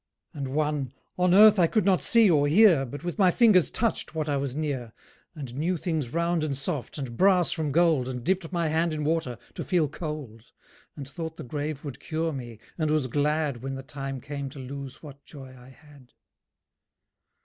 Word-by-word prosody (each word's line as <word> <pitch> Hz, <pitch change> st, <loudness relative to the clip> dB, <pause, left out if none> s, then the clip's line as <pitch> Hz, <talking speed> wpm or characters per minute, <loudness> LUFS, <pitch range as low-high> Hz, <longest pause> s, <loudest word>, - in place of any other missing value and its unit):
And 140 Hz, -2 st, -4 dB
one: 150 Hz, -4 st, -1 dB, 0.3 s
"On 180 Hz, 0 st, +3 dB
earth 210 Hz, +2 st, +7 dB
I 170 Hz, -, +5 dB
could 215 Hz, +2 st, +1 dB
not 190 Hz, -2 st, +3 dB
see 230 Hz, -2 st, +5 dB
or 145 Hz, -5 st, +3 dB
hear, 165 Hz, -5 st, +5 dB
But 145 Hz, +6 st, -8 dB
with 175 Hz, +4 st, -5 dB
my 190 Hz, -2 st, +6 dB
fingers 200 Hz, -3 st, +4 dB
touched 225 Hz, -8 st, -1 dB
what 155 Hz, -1 st, -2 dB
I 145 Hz, -, 0 dB
was 135 Hz, -2 st, -3 dB
near, 135 Hz, -7 st, -3 dB, 0.4 s
And 135 Hz, -6 st, -7 dB
knew 165 Hz, +7 st, -1 dB
things 155 Hz, -7 st, -3 dB
round 170 Hz, 0 st, 0 dB
and 140 Hz, -3 st, -2 dB
soft, 140 Hz, -1 st, -3 dB
and 130 Hz, -5 st, -5 dB
brass 185 Hz, +2 st, +4 dB
from 155 Hz, -3 st, -2 dB
gold, 160 Hz, -5 st, +3 dB
And 125 Hz, -2 st, -5 dB
dipped 185 Hz, 0 st, -1 dB
my 170 Hz, -2 st, 0 dB
hand 160 Hz, +1 st, 0 dB
in 150 Hz, -, -3 dB
water, 150 Hz, -6 st, -1 dB, 0.2 s
to -, -, -5 dB
feel 175 Hz, -5 st, +1 dB
cold, 145 Hz, -8 st, -7 dB, 0.5 s
And 140 Hz, -2 st, -8 dB
thought 160 Hz, +3 st, -6 dB
the -, -, -7 dB
grave 145 Hz, +2 st, -4 dB
would 140 Hz, -3 st, -7 dB
cure 160 Hz, 0 st, -2 dB
me, 120 Hz, -4 st, -7 dB, 0.2 s
and 155 Hz, -1 st, 0 dB
was 155 Hz, -3 st, +1 dB
glad 145 Hz, 0 st, -1 dB
When 135 Hz, +1 st, -4 dB
the 135 Hz, -, -7 dB
time 135 Hz, -1 st, -6 dB
came 140 Hz, +1 st, -6 dB
to 140 Hz, -, -13 dB
lose 140 Hz, +2 st, -8 dB
what 140 Hz, -2 st, -12 dB
joy 135 Hz, -3 st, -11 dB
I 125 Hz, 0 st, -15 dB
had." 140 Hz, -2 st, -19 dB
150 Hz, 200 wpm, -26 LUFS, 135-170 Hz, 0.5 s, earth